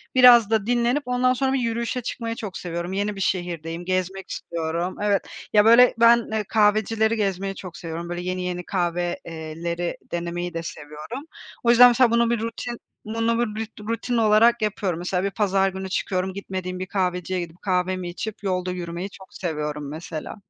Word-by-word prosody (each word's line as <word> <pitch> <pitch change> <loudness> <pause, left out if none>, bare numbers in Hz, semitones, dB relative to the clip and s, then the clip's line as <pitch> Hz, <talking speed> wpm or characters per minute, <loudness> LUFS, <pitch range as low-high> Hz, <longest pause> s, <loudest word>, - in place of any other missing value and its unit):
biraz 245 -4 +8
da 220 -3 +1
dinlenip 245 +4 +1
ondan 250 0 +2
sonra 265 +1 0
yürüyüşe 235 0 -1
çıkmayı 230 -1 -4
çok 210 -5 -6
seviyorum. 175 +1 -4
Yeni 205 +1 -1
bir 195 - -6
şehirdeyim, 175 -2 -2
gezmek 185 +1 -2
istiyorum. 170 +2 -3
Evet, 205 -1 +2 0.3
ya 210 -1 +6
böyle 235 +2 +7
ben, 235 0 +6
eee, 220 -1 0
kahvecileri 220 +1 +3
gezmeyi 195 -2 -1
çok 185 -3 -9
seviyorum, 170 0 -6
böyle 175 0 -3
yeni, 185 0 -3
yeni 180 -1 -3
kahve 175 -1 -1
eee, 160 0 -7
leri 170 0 -2
denemeyi 175 +1 -3
de 165 0 -3
seviyorum. 155 - -7 0.4
O 235 - +2
yüzden 240 +1 +9
mesela 245 0 +4
bunu 235 0 +3
bir 235 -1 +1
rutin 230 +2 -4 0.3
bunu 230 +1 0
bir 220 -2 -1
rut 220 0 -8
rutin 230 +1 -1
olarak 225 +2 +5
yapıyorum. 195 -5 -1
Mesela 180 +1 -1
bir 200 - 0
pazar 195 -1 +2
günü 190 0 -6
çıkıyorum, 185 0 -1
gitmediğim 185 -2 -5
bir 185 - -3
kahveciye 180 -1 -1
gidip 170 0 -7
kahvemi 185 -1 0
içip 210 +4 -6
yolda 185 -2 -1
yürümeyi 175 +1 -5
çok 190 -1 -15
seviyorum 150 -4 -3
mesela. 155 +1 -6
190 Hz, 175 wpm, -24 LUFS, 175-225 Hz, 0.4 s, yüzden